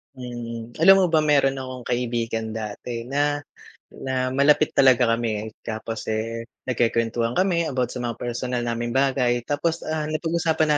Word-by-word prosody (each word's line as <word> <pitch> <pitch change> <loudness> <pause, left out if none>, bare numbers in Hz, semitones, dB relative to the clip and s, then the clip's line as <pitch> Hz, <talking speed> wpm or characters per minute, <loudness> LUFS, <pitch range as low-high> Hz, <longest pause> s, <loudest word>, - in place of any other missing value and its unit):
Mm, 120 -2 -7
alam 195 +4 +8
mo - - +5
ba, 160 - +5
meron 140 -3 +3
akong 130 -1 -7
kaibigan 115 -2 -2
dati 110 +2 -5
na 145 +3 0 0.5
na 130 -1 -2
malapit 140 +3 +4
talaga 130 -2 +5
kami. 110 -2 -2 0.2
Tapos, 110 0 -5
eh, 115 +1 -3 0.2
nagkwekwentuhan 115 -1 +1
kami 180 -1 +2
about 125 -5 -1
sa 125 - -6
mga 120 -1 -4
personal 120 +1 -2
naming 120 0 -2
bagay 130 -3 +2
tapos, 165 +3 -1
ah, 155 -1 -2
napag-usapan 155 -1 +1
125 Hz, 145 wpm, -24 LUFS, 115-145 Hz, 0.5 s, alam